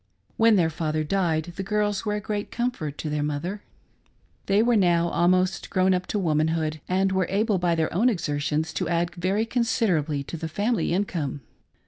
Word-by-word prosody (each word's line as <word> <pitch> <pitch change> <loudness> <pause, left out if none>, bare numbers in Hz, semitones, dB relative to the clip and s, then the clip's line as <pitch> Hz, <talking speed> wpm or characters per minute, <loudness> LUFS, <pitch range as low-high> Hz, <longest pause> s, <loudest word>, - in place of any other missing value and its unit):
When 225 -1 +5
their 165 -4 +2
father 155 -1 -1
died, 170 -1 0
the - - -2
girls 205 +1 -1
were 210 -1 0
a - - -1
great 210 0 -4
comfort 235 - -3
to 155 - -4
their 150 0 -1
mother. 150 +8 -3 0.9
They 200 +2 +4
were 240 0 +3
now 170 -4 +3
almost 185 +2 +1
grown 185 0 +3
up 180 0 -1
to - - -2
womanhood, 155 -3 0
and 190 +1 +2
were 190 -2 +1
able 205 0 +1
by 175 -1 +1
their 160 -1 -1
own 220 +9 +3
exertions 155 -4 -1
to - - -2
add 170 0 0
very 190 +5 0
considerably 195 - 0
to 165 - -7
the 160 - -4
family 205 +1 0
income. 170 -7 -2
180 Hz, 180 wpm, -25 LUFS, 160-205 Hz, 0.9 s, When